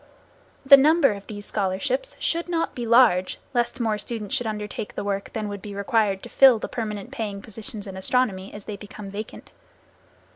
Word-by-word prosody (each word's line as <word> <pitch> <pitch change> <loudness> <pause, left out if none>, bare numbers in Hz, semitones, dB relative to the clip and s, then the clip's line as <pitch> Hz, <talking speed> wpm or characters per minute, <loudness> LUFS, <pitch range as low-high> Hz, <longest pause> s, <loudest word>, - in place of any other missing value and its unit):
The 275 +1 +10
number 300 0 +5
of 200 -1 -8
these 205 -1 -8
scholarships 220 - -1
should 340 +1 -1
not 330 -1 -1
be 240 -2 -4
large, 225 -6 +4
lest 240 +1 0
more 220 -3 0
students 215 0 -5
should 245 -4 0
undertake 210 0 -5
the - - -3
work 200 -1 -3
than 215 -1 -3
would 205 -1 -6
be 205 0 -8
required 200 -1 +1
to - - -8
fill 265 -4 +7
the - - -5
permanent 215 0 -5
paying 215 -7 -4
positions 215 +1 -8
in 195 -2 -8
astronomy, 195 -1 0
as 205 -1 -10
they 210 - -6
become 205 0 -9
vacant. 210 +2 -8
215 Hz, 185 wpm, -24 LUFS, 200-245 Hz, -, The